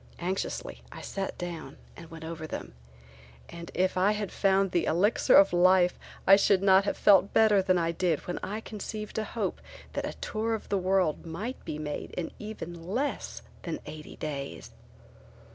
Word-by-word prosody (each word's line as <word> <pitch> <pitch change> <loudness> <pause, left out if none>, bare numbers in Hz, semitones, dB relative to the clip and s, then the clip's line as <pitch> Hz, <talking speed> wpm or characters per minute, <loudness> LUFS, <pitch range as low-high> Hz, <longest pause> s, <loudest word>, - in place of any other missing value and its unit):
Anxiously 185 +2 -3
I - - -9
sat 195 -1 -4
down 170 -6 -6 0.2
and 165 -1 -11
went 165 -1 -10
over 160 -1 -6
them - - -6 0.8
and 170 0 -8
if 185 +1 +1
I 195 +3 +4
had 210 -2 -3
found 195 -1 +2
the 175 - +1
elixir 195 +8 +3
of 195 -2 +7
life 180 0 +4 0.3
I 195 - +8
should 195 -1 +3
not 195 0 +6
have - - -1
felt 195 -1 +5
better 215 -3 +5
than 185 -1 +2
I 165 -1 +1
did 170 -2 0
when 175 - -3
I 210 +3 -4
conceived 215 0 -5
a - - -1
hope - - -3 0.3
that - - -2
a - - -7
tour 225 +1 -2
of 220 - -9
the 200 - +1
world 185 -3 +1
might 205 +11 -5
be 150 - -4
made 150 -1 -5
in 175 -2 -3
even 190 -6 -7
less 255 +9 -2 0.2
than - - -4
eighty 155 -1 -9
days. 140 -3 -6
185 Hz, 180 wpm, -29 LUFS, 170-205 Hz, 0.8 s, I